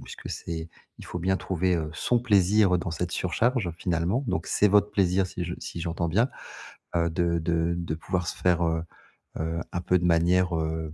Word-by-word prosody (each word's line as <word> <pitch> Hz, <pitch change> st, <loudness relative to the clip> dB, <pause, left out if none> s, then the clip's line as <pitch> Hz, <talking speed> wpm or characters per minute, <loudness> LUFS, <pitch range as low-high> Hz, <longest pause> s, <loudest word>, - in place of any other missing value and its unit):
puisque -, -, -9 dB
c'est 80 Hz, -1 st, -5 dB, 0.3 s
il -, -, -10 dB
faut 90 Hz, -, -5 dB
bien 95 Hz, +2 st, +1 dB
trouver, 95 Hz, -1 st, 0 dB
heu, 80 Hz, -2 st, -3 dB
son 120 Hz, +9 st, +1 dB
plaisir 100 Hz, -4 st, +4 dB
dans 85 Hz, -, -3 dB
cette 85 Hz, +1 st, -3 dB
surcharge 110 Hz, +2 st, 0 dB
finalement. 90 Hz, -, 0 dB
Donc 80 Hz, -7 st, -1 dB
c'est 105 Hz, -, +3 dB
votre 105 Hz, +1 st, +4 dB
plaisir 95 Hz, -1 st, +2 dB
si 90 Hz, -1 st, -5 dB
je 85 Hz, -, -4 dB
si 85 Hz, -, -7 dB
j'entends 85 Hz, +1 st, -2 dB
bien, 110 Hz, +10 st, +2 dB, 0.7 s
heu, 85 Hz, 0 st, +2 dB
de 85 Hz, 0 st, 0 dB
de 85 Hz, +1 st, 0 dB
de 85 Hz, -2 st, -3 dB
pouvoir 90 Hz, +1 st, -2 dB
se -, -, -4 dB
faire, 90 Hz, -1 st, +2 dB
heu 80 Hz, 0 st, 0 dB, 0.6 s
heu, 80 Hz, +1 st, -2 dB
un 85 Hz, -, -1 dB
peu 90 Hz, 0 st, +2 dB
de 90 Hz, -, -1 dB
manière, 85 Hz, +1 st, +3 dB
heu, 80 Hz, -1 st, -3 dB
85 Hz, 200 wpm, -27 LUFS, 85-95 Hz, 0.7 s, plaisir